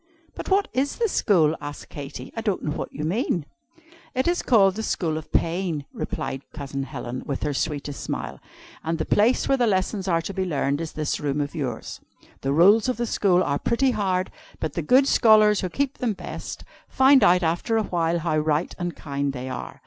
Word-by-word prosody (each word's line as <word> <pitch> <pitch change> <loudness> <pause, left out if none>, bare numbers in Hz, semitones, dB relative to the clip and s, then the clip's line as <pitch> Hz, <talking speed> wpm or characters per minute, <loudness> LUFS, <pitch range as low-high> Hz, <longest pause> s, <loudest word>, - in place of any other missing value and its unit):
'" 330 - -35
"But - - -7
what 400 +1 +3
is 275 +2 0
the 470 - +1
school?" 165 - +3
asked 145 0 -8
Katy. 145 0 -8
"I 225 - -3
don't 205 -4 -1
know 150 - -1
what 165 - -5
you 150 - -6
mean." 175 - 0 0.7
"It 260 +4 +1
is 350 +1 +1
called 195 -6 +4
The 220 - -4
School 170 -7 -1
of 155 0 -7
Pain," 165 -4 0
replied 135 - -4
Cousin 140 -2 -4
Helen, 130 -2 -5
with 140 - -3
her 150 - -1
sweetest 145 0 -3
smile. - - -4 0.4
"And 165 +1 -1
the 160 - -2
place 220 +5 +3
where 270 - +2
the 240 - +3
lessons 190 0 0
are 165 -2 +1
to 195 - -5
be 190 0 -1
learned 145 -4 -1
is 165 - -5
this 155 -1 -2
room 145 0 -1
of 145 0 -2
yours. 130 -8 -5 0.4
The 135 - -1
rules 200 - +5
of 255 - -1
the 240 - -1
school 185 -5 +2
are 140 -3 -1
pretty 255 +3 +2
hard, 190 -4 -1 0.3
but 155 -2 -3
the 170 - -2
good 260 - +4
scholars, 215 -4 +5
who 185 - -2
keep 275 +7 -2
them 235 -4 0
best, - - -7 0.3
find 265 0 +5
out 180 +1 +5
after 170 +8 0
a 220 - +2
while 170 -3 0
how 160 -2 0
right 155 +2 0
and 175 -1 -3
kind 140 -1 -3
they 130 0 -5
are. 130 - -6
175 Hz, 210 wpm, -24 LUFS, 150-220 Hz, 0.7 s, rules